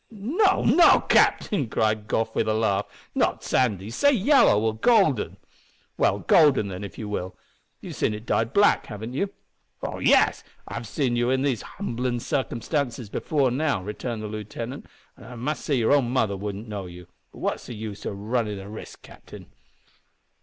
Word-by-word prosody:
"No, 295 - +1
no, 315 +9 +6
captain!" 145 - +2
cried 110 -1 0
Goff, 110 0 -1
with 110 - 0
a 110 - +1
laugh, 105 -2 0 0.3
"not - - 0
sandy; 105 -5 0
say 285 - +3
yellow, 250 - +4
or 110 -1 0
golden." 160 - +2 0.6
"Well, - - +2
golden, 140 -10 +4
then, 95 +1 -6
if 100 - -8
you 110 - -5
will. 95 -3 -4 0.4
You've - - -8
seen 105 - 0
it 105 +2 -9
dyed 115 -1 0
black, 205 0 +3
haven't 110 +2 -7
you?" 195 +9 -1 0.5
"Oh - - -4
yes! - - +3 0.2
I've 115 - -6
seen 125 +2 -1
you 120 +1 +1
in 130 +1 +1
these 135 -6 0
humblin' 125 - -3
circumstances 125 -3 -2
before 140 -5 0
now," 140 -6 0
returned 110 +2 -5
the - - -4
lieutenant, 110 +5 -7 0.3
"and - - -15
I 125 - -9
must 135 +6 -3
say 145 - 0
your 120 +1 +2
own 135 -5 +3
mother 110 -5 +1
wouldn't 100 +2 -6
know 100 -3 -5
you. 90 0 -11 0.3
But - - -15
what's - - -2
the 120 - -7
use 105 -1 -7
o' - - -3
runnin' 105 +1 -2
the 95 +1 -9
risk, 110 - -10
captain?" - - -13
115 Hz, 175 wpm, -25 LUFS, 105-140 Hz, 0.6 s, no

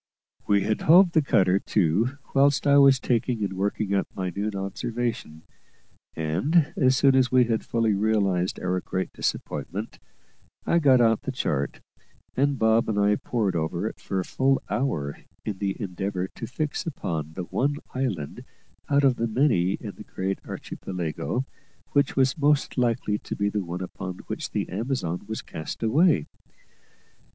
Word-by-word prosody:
We 100 -1 +3
had 110 0 -1
hove 175 +3 +6
the 160 - +4
cutter 95 -8 +3
to 105 - +1 0.2
whilst 140 0 +3
I 140 0 +6
was 135 -2 +6
taking 120 -2 0
and 95 - -2
working 100 +1 -1
up 100 - +1
my 95 -1 -2
noon 105 +1 -2
observation; 100 -4 -4 0.7
and, 100 - +1
as 130 -1 +3
soon 135 -1 +5
as 130 -1 +3
we 130 -1 +6
had 115 -2 -1
fully 115 -2 +1
realised 100 -3 +1
our 90 0 -1
great 95 0 -3
disappointment, - - -4 0.7
I 170 - +3
got 135 -5 +5
out 115 -2 +3
the 135 - -3
chart, 75 - -2 0.5
and 140 +1 +2
Bob 110 0 +3
and 105 - -1
I 105 0 +4
pored 110 -7 -1
over 80 -1 -1
it - - -5
for 95 - -3
a 90 - -2
full 135 +1 +2
hour 75 - -1 0.3
in 100 -3 -4
the 100 -1 -2
endeavour 95 -1 -3
to 115 - -7
fix 145 +4 -3
upon 80 - -4
the 90 - -4
one 140 +10 0 0.2
island 130 - -3 0.5
out 140 0 +3
of 130 -3 +4
the 115 - 0
many 110 -7 +2
in - - -5
the - - -9
great 95 +1 -3
Archipelago 90 +8 -4 0.5
which 140 -1 +2
was 135 +3 +2
most 145 0 +2
likely 115 -4 0
to - - -6
be 100 0 0
the 105 -1 -2
one 90 +1 -5
upon 95 0 -6
which - - -4
the - - -2
Amazon 95 -4 -3
was 110 - -4
cast 80 +8 -7
away. 135 - +3
110 Hz, 165 wpm, -25 LUFS, 95-135 Hz, 0.7 s, hove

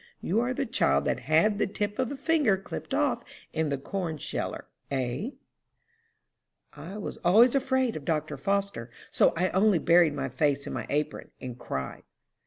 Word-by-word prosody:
You 200 +6 0
are 245 +2 0
the 275 +2 -1
child 70 - +2
that - - 0
had 160 - +3
the - - +2
tip 205 +1 -3
of 255 - 0
a - - -3
finger 285 - +2
clipped 195 - -7
off - - +1 0.3
in 160 -1 0
the 140 - 0
corn 165 +2 -3
sheller, - - -4 0.2
hey?'" 135 - -2 1.4
"I 195 - -8
was 210 - -5
always 220 +8 +5
afraid 260 -3 +1
of 155 - -5
Dr. 155 0 -1
Foster, 195 -5 -1 0.2
so - - +4
I 185 +2 +2
only 195 0 +4
buried 165 -1 +4
my 135 -2 -2
face 140 +2 0
in - - -5
my - - -4
apron, 150 +1 -2
and 125 -2 -6
cried." 65 - -5
175 Hz, 175 wpm, -28 LUFS, 145-215 Hz, 1.4 s, always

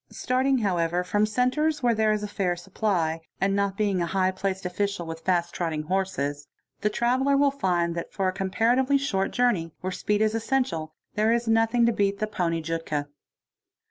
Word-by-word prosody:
| - - -48
Starting, 260 +1 +1
however, 180 -5 0
from 205 +4 +1
centres 265 +7 +1
where 240 -1 +4
there 220 -1 +2
is 210 0 -1
a - - -2
fair 190 -3 -1
supply,—and; 190 +1 -1
being 200 -4 +1
a 170 - 0
high 185 +1 +1
placed 190 0 -3
official 200 0 -2
with 165 0 -6
fast 175 0 0
trotting 160 -3 -2
horses,—the 155 0 -3
traveller: 255 +5 +2
ll 280 0 +4
find 175 -10 0
that 170 0 -5
for 195 -2 -1
a - - +2
comparatively 235 +9 +2
short 195 -9 0
journey, 205 -10 +1
where 185 - -3
speed 205 +2 0
is 215 0 +1
essential, 225 -9 -1 0.2
here 215 +1 +3
is 235 0 +1
nothing 225 +1 +3
to 235 - +4
beat 200 -1 +1
the 215 - -1
poney 170 -6 -2
jutka. 155 -3 -3
195 Hz, 175 wpm, -26 LUFS, 175-225 Hz, 0.2 s, where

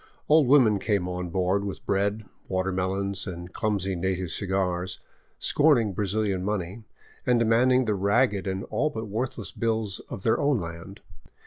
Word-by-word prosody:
Old 150 -3 +5
women 120 -7 +5
came 100 -3 0
on 90 0 -4
board 95 +3 0
with 100 -2 -6
bread, 100 +2 0 0.2
watermelons, 95 +1 -1
and 90 -1 -7
clumsy 100 -3 -1
native 90 -1 -2
cigars, 95 -2 -1 0.4
scorning 130 -9 +3
Brazilian 100 -1 -1
money, 105 +2 -3 0.4
and 125 -1 +3
demanding 120 +3 +3
the 110 - +1
ragged 100 +1 +1
and 95 0 -2
all 150 +3 +1
but 110 -5 -5
worthless 120 +5 -4
bills 110 -4 -1
of 95 - -6
their 110 - +2
own 145 -2 +2
land. 85 +1 -7
100 Hz, 145 wpm, -26 LUFS, 95-115 Hz, 0.4 s, Old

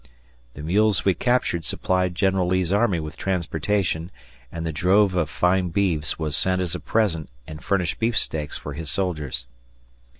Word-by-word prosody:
The 70 - -8
mules 100 +4 +2
we 95 - +4
captured 120 -4 0
supplied 90 +4 0
General 95 -1 +2
Lee's 95 0 +1
army 100 -4 +2
with 75 -1 -7
transportation, 85 -1 -1 0.4
and 85 0 -5
the 80 - -1
drove 95 +5 +3
of 85 -5 0
fine 90 +3 +1
beeves 80 -5 0
was 75 -2 -1
sent 90 +3 +2
as 90 -3 -1
a 90 - -3
present 95 -9 0 0.2
and 75 +2 -9
furnished 90 -5 0
beefsteaks 105 -10 0
for 75 - -7
his 80 +1 -6
soldiers. 75 -8 -2
90 Hz, 160 wpm, -24 LUFS, 80-95 Hz, 0.4 s, we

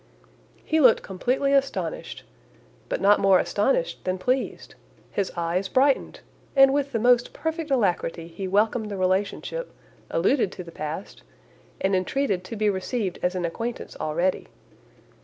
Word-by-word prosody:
He 320 - +2
looked 255 -6 +5
completely 255 +8 0
astonished, 275 - -1 0.7
but - - -2
not 205 +1 +5
more 195 -1 +5
astonished 190 -5 0
than 185 0 -1
pleased; 255 +8 -2 0.4
his 200 -2 -1
eyes 170 +3 -1
brightened! 270 +5 +1 0.3
and 270 0 +7
with 280 -1 0
the 230 - 0
most 245 +1 +3
perfect 320 +1 -3
alacrity 180 -9 0
he 175 +3 -6
welcomed 215 +3 +1
the 200 - -4
relationship, 195 - -1 0.4
alluded 195 - +2
to 180 - -7
the 170 - -11
past, 155 0 -6 0.6
and 190 0 +1
entreated 190 0 0
to 225 - -6
be 215 0 0
received 195 0 -2
as 180 +1 0
an 180 -1 -1
acquaintance 230 +8 -5
already. 170 +4 0
205 Hz, 140 wpm, -25 LUFS, 185-265 Hz, 0.7 s, and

